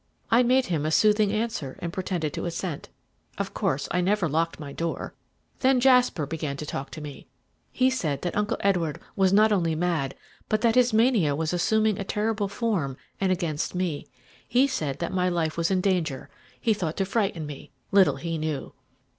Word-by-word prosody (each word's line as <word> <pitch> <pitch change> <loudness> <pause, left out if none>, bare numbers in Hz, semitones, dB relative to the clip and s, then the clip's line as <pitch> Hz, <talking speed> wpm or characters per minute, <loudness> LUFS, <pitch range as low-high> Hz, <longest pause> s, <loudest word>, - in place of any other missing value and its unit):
"I 230 +2 +6
made 255 +1 +3
him 160 -8 -1
a 155 - 0
soothing 210 +4 +4
answer, 215 - -3
and 170 -1 -5
pretended 180 -5 -2
to - - -4
assent. 170 -2 -4 0.5
Of - - -3
course 140 +1 -1
I 180 - +1
never 195 0 +1
locked 165 +3 -1
my 145 -2 -7
door. 165 +2 -3 0.5
Then 265 -1 +4
Jasper 250 - +4
began 150 -2 -4
to 150 - -5
talk 140 -1 -5
to 155 - -7
me. 145 -2 -9 0.4
He 255 0 +2
said 160 - -2
that 175 - -2
Uncle 210 0 0
Edward 175 -7 +1 0.2
was 190 -1 +3
not 215 +2 +5
only 170 -5 +1
mad, 160 -5 -1 0.3
but 215 0 +1
that 230 -1 +3
his 250 0 +4
mania 220 - +3
was 160 +2 -1
assuming 215 +4 +2
a - - -1
terrible 210 +1 -1
form, 195 - -1 0.2
and 190 -1 +1
against 170 -3 -2
me. 175 -5 -2 0.4
He 250 +3 +4
said 155 - -2
that 170 +2 -3
my 180 -1 +2
life 165 -3 -1
was 170 0 0
in 190 -1 +2
danger 180 -8 -1 0.3
he 225 - +2
thought 170 -6 -3
to 195 - +1
frighten 195 -6 -1
me 145 -2 -9 0.2
little 190 -8 +5
he 165 +3 -4
knew!" 155 -2 -3
180 Hz, 190 wpm, -26 LUFS, 155-215 Hz, 0.5 s, I